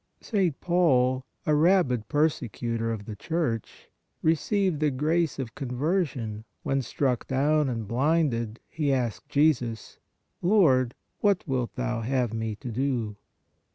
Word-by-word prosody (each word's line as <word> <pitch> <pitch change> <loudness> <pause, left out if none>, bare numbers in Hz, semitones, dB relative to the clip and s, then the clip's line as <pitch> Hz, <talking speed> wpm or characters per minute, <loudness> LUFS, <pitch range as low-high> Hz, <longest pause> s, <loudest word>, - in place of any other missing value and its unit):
St. 190 - 0
Paul, 130 -7 +3 0.2
a 155 - +2
rabid 150 - +3
per 150 +6 +4
secutor 115 -4 -3
of 105 -3 -5
the 110 - -6
Church, 145 - -3 0.4
received 180 +1 +1
the 150 -1 +3
grace 155 +4 0
of 130 -5 -5
con 135 - -5
version 125 - -1 0.2
when, 135 0 +1
struck 125 0 -1
down 145 +2 +2
and 115 -4 -3
blinded, 120 -3 +1
he 150 -3 -1
asked 125 0 -1
Jesus: 140 -7 +1 0.2
" - - -49
Lord, 145 - +4 0.2
what 200 -4 +2
wilt 130 -4 -1
Thou 125 -2 -2
have 125 -1 0
me 110 -1 -2
to 120 +3 -7
do 120 -4 -1
130 Hz, 140 wpm, -27 LUFS, 115-155 Hz, 0.4 s, per